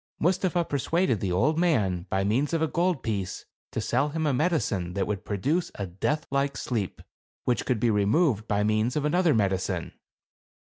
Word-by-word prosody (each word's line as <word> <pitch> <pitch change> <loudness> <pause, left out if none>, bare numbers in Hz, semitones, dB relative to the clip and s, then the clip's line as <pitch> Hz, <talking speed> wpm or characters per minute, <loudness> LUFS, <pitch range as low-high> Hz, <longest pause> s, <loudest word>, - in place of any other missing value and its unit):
Mustapha 180 0 +1
persuaded 145 - 0
the 95 -2 -2
old 150 - +2
man, 100 - +1
by 95 0 +1
means 125 +10 +1
of 165 - +1
a - - +2
gold 175 -1 0
piece, 100 -5 -3 0.2
to - - -3
sell 150 - +1
him 160 +1 -2
a 145 - +2
medicine 125 - 0
that 100 - 0
would 100 -3 -3
produce 140 - 0
a 100 - -3
death 145 - -2
like 140 0 0
sleep, 110 -7 -3 0.4
which 125 - 0
could 125 -4 +1
be 115 +1 +2
removed 110 - +2
by 105 -1 +1
means 110 +3 +1
of 150 -1 0
another 170 -1 +3
medicine. 95 -3 -1
125 Hz, 180 wpm, -27 LUFS, 100-160 Hz, 0.4 s, another